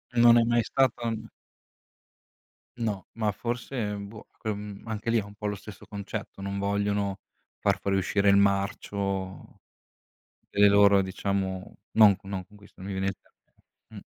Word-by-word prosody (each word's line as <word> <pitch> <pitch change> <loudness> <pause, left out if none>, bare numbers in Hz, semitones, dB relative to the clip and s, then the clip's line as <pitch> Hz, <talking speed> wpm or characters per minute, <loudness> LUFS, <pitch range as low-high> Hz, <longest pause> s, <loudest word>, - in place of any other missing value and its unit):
Non 120 0 +7
è - - +4
mai 120 0 +2
stato 120 -3 +1 1.7
No, 110 -5 -2
ma 110 -2 0
forse, 120 +5 -4
ehm, 105 -4 -3
boh 110 +1 -12
cre 110 -2 -2
mhmm, 105 +1 -8
anche 110 0 -3
lì 115 - +3
è - - -3
un 100 0 -12
po' 105 0 -4
lo 105 - -1
stesso 100 -1 -11
concetto, 100 -1 -6
non 100 0 -3
vogliono 100 0 0 0.4
far - - +2
fuoriuscire 100 +1 +1
il 100 - +6
marcio 100 -1 -1 0.9
delle 100 0 +5
loro 100 0 +6
diciamo 95 0 -2 0.2
non 105 -3 +7
non 95 -1 -5
con 105 - -18
queste, 100 -1 -18
non 95 +2 -6
mi 95 - -3
vien 95 0 0
il 95 - -2
te - - -30 0.7
mh. - - -7
100 Hz, 160 wpm, -27 LUFS, 100-110 Hz, 1.7 s, Non